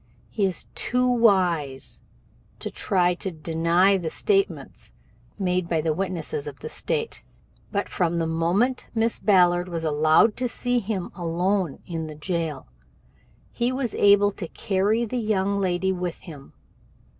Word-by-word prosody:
"He 205 - +1
is 180 -4 -2
too 250 0 0
wise 180 - +1 0.6
to - - -5
try 180 -2 +1
to 185 +2 -4
deny 170 +4 +2
the 165 -3 -3
statements 395 - -1 0.4
made 180 -3 0
by 165 - +1
the 155 0 0
witnesses 190 - -3
of - - -7
the - - -6
State, 460 -1 -2 0.5
but 200 -1 -1
from 170 -2 0
the 165 - 0
moment 175 +11 0
Miss 225 +1 +1
Ballard 180 -3 +3
was 165 -2 -3
allowed 155 +7 +4
to 255 - 0
see 245 +1 0
him 200 -4 -4
alone 175 0 -1
in 165 -2 -4
the 155 - -8
jail, 165 -1 -3 0.9
he 240 +1 0
has 255 -3 -2
been - - -5
able 205 0 +6
to 190 -3 -6
carry 210 +5 0
the 250 +3 -4
young 200 -2 0
lady 190 0 0
with 180 -2 -4
him. 145 -6 -11
185 Hz, 150 wpm, -24 LUFS, 165-210 Hz, 0.9 s, able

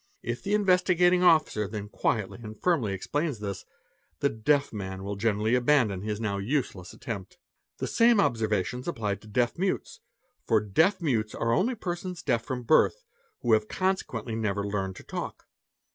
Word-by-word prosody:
If 120 +1 -3
the 205 +1 0
Investi 185 -3 +3
gating 180 +1 +5
Officer 155 - +4
then 105 0 -5
quietly 105 -1 -1
and 110 -1 -9
firmly 150 - +1
explains 145 - -2
this, 100 -2 -5 0.5
the 140 - +2
"deaf"? 140 +5 +1
man 95 -2 -5
wil 100 +1 -3
generally 110 +2 +1
abandon 125 -6 +3
his 105 0 -3
now 100 -3 -1
useless 100 -5 -2
attempt.. 100 -6 -7 0.4
The - - -3
same 230 -1 +4
observations 115 - 0
apply 110 -11 -1
to 110 - -17
deaf 120 +8 0
mutes, 190 0 -2 0.4
for 110 - +3
deaf 160 - +2
mutes 110 -8 0
are 115 0 0
all 235 - +2
persons 175 -2 -5
deaf 120 -5 +1
from 130 -2 -4
birth, 115 - +3 0.4
who 120 - +3
have 110 -1 +3
consequently 125 - -2
never 100 -3 -1
learned 95 -2 -2
to - - -11
talk. - - -6
115 Hz, 165 wpm, -28 LUFS, 105-160 Hz, 0.5 s, gating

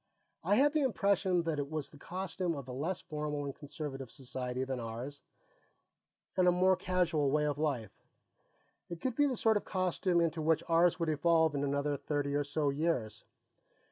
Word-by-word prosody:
I 195 +5 +3
had 285 +5 +4
the 310 - +2
impression 195 -7 +2
that 160 -3 -1
it 140 0 -3
was 155 -2 -4
the 150 - -14
costume 180 0 -3
of 140 -3 -7
a - - -6
less 155 +8 -2
formal 150 -1 -3
and 140 - -4
conservative 140 -3 -6
society 130 -1 -4
than 130 -1 -3
ours 120 +5 -6 1.1
and 185 -1 +4
a - - +7
more 185 +1 +4
casual 175 -6 +1
way 150 +2 +2
of 145 -1 -1
life. 130 -10 -2 0.9
It 170 -1 -6
could 255 +4 -2
be 290 0 +4
the 255 -3 -1
sort 220 -1 +3
of - - -4
costume 185 -1 +1
into 165 -1 +1
which 160 0 +2
ours 170 +2 +4
would 165 -1 0
evolve 160 +1 +3
in 140 0 -1
another 140 +1 0
thirty 145 0 -2
or 145 0 +1
so 145 0 0
years. 140 -7 -1
155 Hz, 185 wpm, -33 LUFS, 140-180 Hz, 1.1 s, a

